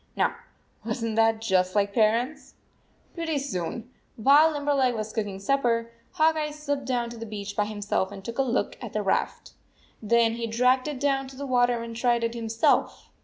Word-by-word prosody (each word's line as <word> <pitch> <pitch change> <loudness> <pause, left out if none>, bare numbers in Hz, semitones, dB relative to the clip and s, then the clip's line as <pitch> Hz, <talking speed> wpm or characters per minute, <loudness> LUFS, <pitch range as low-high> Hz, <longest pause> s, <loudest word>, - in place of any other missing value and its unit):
Now, - - +1 0.5
was 225 +1 -3
n 230 - -1
t - - -4
that 225 0 +3
just 185 -3 +1
like 200 -1 +1
parents? 235 +7 0 0.6
Pretty 330 -3 -2
soon, 235 -2 -4 0.2
while 285 +7 +6
Limberleg 285 -4 +1
was 215 0 -4
cook 220 -2 -1
ing 195 -1 -6
supper, 230 +1 0 0.2
Hawk 315 +1 +3
Eye 305 -1 -1
slipped 285 -2 -4
down 240 -2 -1
to 235 - -9
the 230 - -6
beach 205 -1 -6
by 210 - +1
himself 205 -2 -2
and 195 0 -10
took 235 +2 -6
a - - +6
look 255 -2 -1
at - - -7
the - - -1
raft. - - -1 0.5
Theri\he 230 +1 +2
dragged 250 +4 +2
it 295 -3 -4
down 270 -1 0
to 265 - -12
the 280 +2 -6
water 245 -2 +2
and 230 0 -7
tried 235 0 +1
it 230 0 -1
himself. 230 -1 0
235 Hz, 195 wpm, -26 LUFS, 220-270 Hz, 0.6 s, while